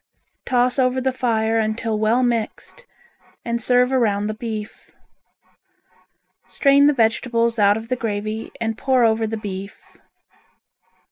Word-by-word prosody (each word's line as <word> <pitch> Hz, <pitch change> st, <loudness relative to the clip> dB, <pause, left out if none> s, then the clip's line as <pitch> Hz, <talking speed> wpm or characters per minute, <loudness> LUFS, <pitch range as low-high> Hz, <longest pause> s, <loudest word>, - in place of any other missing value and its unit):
Toss 250 Hz, +1 st, +1 dB
over 255 Hz, 0 st, +2 dB
the 260 Hz, +1 st, 0 dB
fire 225 Hz, -3 st, 0 dB
until 220 Hz, 0 st, -2 dB
well 225 Hz, +4 st, +2 dB
mixed 240 Hz, -, -3 dB, 0.6 s
and 235 Hz, 0 st, -2 dB
serve 250 Hz, +2 st, +2 dB
around 210 Hz, -6 st, +1 dB
the 215 Hz, -, -2 dB
beef. 215 Hz, -1 st, -7 dB, 1.5 s
Strain 280 Hz, 0 st, +4 dB
the -, -, +5 dB
vegetables 230 Hz, -1 st, 0 dB
out 205 Hz, 0 st, +4 dB
of 225 Hz, 0 st, -8 dB
the 255 Hz, -, -1 dB
gravy 215 Hz, -1 st, -4 dB
and 225 Hz, 0 st, -3 dB
pour 260 Hz, -2 st, +2 dB
over 220 Hz, 0 st, +1 dB
the 225 Hz, +1 st, -4 dB
beef. 200 Hz, -2 st, -8 dB
230 Hz, 130 wpm, -21 LUFS, 215-250 Hz, 1.5 s, the